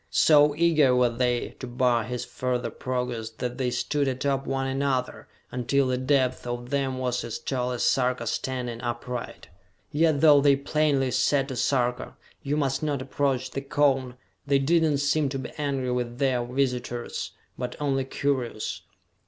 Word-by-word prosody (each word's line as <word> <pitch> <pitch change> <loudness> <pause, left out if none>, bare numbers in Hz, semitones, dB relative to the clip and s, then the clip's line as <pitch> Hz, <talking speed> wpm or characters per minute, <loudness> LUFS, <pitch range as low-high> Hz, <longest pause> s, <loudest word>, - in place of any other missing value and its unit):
So 150 -1 +5
eager 155 -5 +4
were 125 -1 +3
they 120 0 0
to 130 - -6
bar 120 -2 +1
his 125 +1 -4
further 125 -1 -2
progress 125 -3 -3
that 120 +2 -5
they 125 -2 +1
stood 140 +3 0
atop 135 +1 -1
one 135 0 -1
another, 135 -1 -1 0.2
until 130 +3 +1
the 130 -1 0
depth 130 -2 +1
of 120 +1 -5
them 135 -2 0
was 125 -1 -1
as 115 -1 -4
tall 125 -2 -2
as 125 - -2
Sarka 125 -2 +1
standing 120 0 -3
upright. 120 0 -5 0.4
Yet, 155 -1 +2
though 150 -3 +7
they 140 -1 +5
plainly 140 -2 +1
said 135 0 +2
to 130 - -4
Sarka: 125 0 0 0.3
"You 145 +2 -1
must 135 -2 0
not 150 -3 -1
approach 135 -1 -1
the 135 - -3
cone," 135 -3 +1 0.3
they 140 0 +4
did 160 +5 +3
not 155 -3 +2
seem 145 +1 +1
to 135 - -3
be 130 -2 -6
angry 135 -3 -1
with 120 -1 -2
their 130 -3 +1
visitors, 125 -2 -2 0.2
but 125 -1 -4
only 135 -2 0
curious. 130 -5 -2
130 Hz, 165 wpm, -26 LUFS, 125-140 Hz, 0.4 s, though